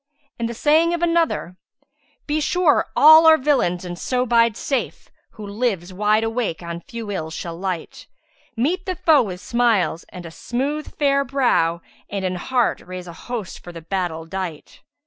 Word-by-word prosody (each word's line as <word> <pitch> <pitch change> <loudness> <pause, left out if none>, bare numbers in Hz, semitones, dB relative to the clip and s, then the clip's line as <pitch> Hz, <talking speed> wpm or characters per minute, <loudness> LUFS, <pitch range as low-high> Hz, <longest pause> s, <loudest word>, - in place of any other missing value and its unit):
And 230 0 -1
the 235 - -6
saying 320 +6 +3
of 345 - -4
another, 335 - 0 0.7
'Be 305 +1 -1
sure 345 0 +2
all 315 +2 +8
are 320 0 +8
villains 255 - +1
and 175 -1 -6
so 250 -1 0
bide 230 -2 +3
safe; 270 -3 -3
* - - -48
Who 215 - -9
lives 200 -4 -2
wide 210 +3 +2
awake 225 -7 -2
on 170 0 -6
few 225 +3 -7
Ills 160 -4 -4
shall 170 -1 -5
light: 180 -2 -5 0.5
Meet 345 +11 -1
thy 370 - -1
foe 315 -4 +4
with 185 -6 -5
smiles 230 -9 +1
and 180 -1 -10
a 165 - -8
smooth 275 - -3
fair 280 -1 +2
brow, 240 -11 +1
* - - -32
And 195 -2 -3
in 185 - -1
heart 240 +7 0
raise 185 0 -8
a 170 - -9
host 220 +1 -7
for 175 - -9
the 165 -2 -10
battle 170 -2 -3
dight!' 175 -3 -6
225 Hz, 180 wpm, -21 LUFS, 180-280 Hz, 0.7 s, all